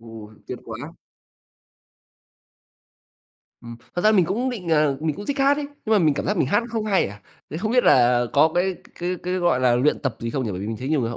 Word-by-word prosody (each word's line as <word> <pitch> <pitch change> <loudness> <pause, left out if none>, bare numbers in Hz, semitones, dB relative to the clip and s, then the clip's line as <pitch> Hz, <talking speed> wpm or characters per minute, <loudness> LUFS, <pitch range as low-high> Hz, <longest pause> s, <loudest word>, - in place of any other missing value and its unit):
Ồ, 115 -2 -11
tuyệt - - -6
quá. - - -8 2.7
Ừm, 115 -1 -10 0.2
thật 175 - -2
ra 215 - +5
mình 190 -5 +4
cũng 235 +10 -1
định 200 -8 -6
ờ, 150 -3 +2
mình 155 -2 -2
cũng 205 - -8
thích 285 0 -2
hát 275 +1 +4
ấy, 290 -1 -3 0.2
nhưng 220 - 0
mà 215 - +5
mình 155 -6 +3
cảm - - -3
giác 205 - 0
mình 165 - +1
hát 205 - +2
không 225 -1 -2
hay 200 -3 +2
à, 105 +1 -10 0.3
thế 150 - -5
không 215 +7 -2
biết 250 - +3
là 120 -1 +4
có 150 +3 +5
cái 185 +1 +1
c - - -20
cái 180 +1 -2
cái, 180 +1 -2
gọi 175 -8 +1
là, 125 -1 +3
luyện 135 +5 +2
tập 130 -5 -2
gì 115 - -3
không 130 +1 -2
nhỉ? 110 - -3
Bởi 90 -1 -5
vì 100 - -4
mình 110 0 -4
thấy 130 +4 -5
nhiều 155 -2 +1
người 115 -2 -2
họ 120 - -6
160 Hz, 260 wpm, -23 LUFS, 120-205 Hz, 2.7 s, ra